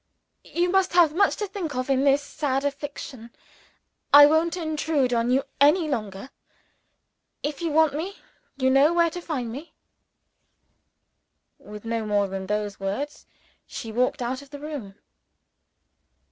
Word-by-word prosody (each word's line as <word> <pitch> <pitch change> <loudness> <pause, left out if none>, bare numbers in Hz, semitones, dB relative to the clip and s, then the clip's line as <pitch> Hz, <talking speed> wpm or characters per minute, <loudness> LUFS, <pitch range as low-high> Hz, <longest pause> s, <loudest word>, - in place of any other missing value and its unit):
"You 350 +1 +2
must 385 -1 +2
have 340 -4 +5
much 395 +4 +3
to 420 - -3
think 370 -8 -5
of 255 0 -2
in 270 0 +2
this 280 +1 +3
sad 280 -1 -2
affliction: 280 -4 -6 0.8
I 290 0 +10
won't 320 +3 +2
intrude 310 -5 0
on 235 0 +1
you 265 +2 +2 0.2
any 305 +4 +4
longer. 215 -3 -4 1.1
If 295 +2 -3
you 335 - -1
want 315 -1 +3
me, 350 +7 -5 0.4
you 260 -1 +2
know 280 +5 +5
where 340 -1 +3
to 355 - -6
find 260 -9 -4
me." 285 +8 -9 1.8
With 210 +1 -11
no 225 0 -2
more 205 -1 +1
than 190 0 -6
those 210 -1 -2
words, 205 +10 -4 0.4
she 225 - -7
walked 250 +3 0
out 255 +3 -3
of 280 - -15
the 290 - -8
room. 285 -10 -7
280 Hz, 145 wpm, -25 LUFS, 240-315 Hz, 1.8 s, I